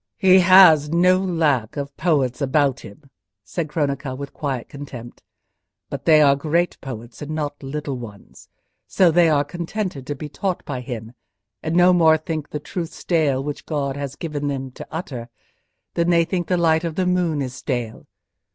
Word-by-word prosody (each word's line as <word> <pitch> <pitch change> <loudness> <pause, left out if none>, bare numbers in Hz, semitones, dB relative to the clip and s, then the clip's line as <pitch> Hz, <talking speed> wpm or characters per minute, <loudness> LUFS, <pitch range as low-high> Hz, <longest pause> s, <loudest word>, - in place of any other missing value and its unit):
"He 190 0 +6
has 175 -5 +7
no 180 +3 +4
lack 155 - 0
of 140 -1 -5
poets 145 -6 0
about 140 -1 +1
him," 100 +9 -13 0.4
said 155 - -4
Cronaca, 140 -3 -2
with 140 0 -7
quiet 135 -5 -4
contempt, 130 -4 -10 0.7
"but - - -6
they 155 -2 +6
are 140 -1 +5
great 165 +5 -1
poets 120 -3 -8
and 150 - -6
not 145 -2 -4
little 140 -1 -4
ones; 105 -5 -12 0.4
so 185 -3 +4
they 170 0 +4
are 145 -2 +3
contented 170 -2 -5
to 145 - -3
be 150 +2 -7
taught 180 +5 -3
by 130 -3 -4
him, 115 -3 -7 0.5
and 160 +1 -2
no 180 +1 +6
more 160 -3 +5
think 155 -1 -5
the 150 - -4
truth 165 +3 -5
stale 150 -6 0
which 145 0 -6
God 140 -3 -2
has 140 -1 -5
given 145 -3 -4
him 135 -2 -4
to - - -10
utter, 130 -8 -6 0.6
than 170 0 +1
they 170 -1 +4
think 175 0 -2
the 180 - +1
light 160 -1 +2
of 165 -2 -3
the 185 - 0
moon 180 -4 +1
is 130 -1 -5
stale. 120 -4 -4
150 Hz, 180 wpm, -22 LUFS, 135-170 Hz, 0.7 s, has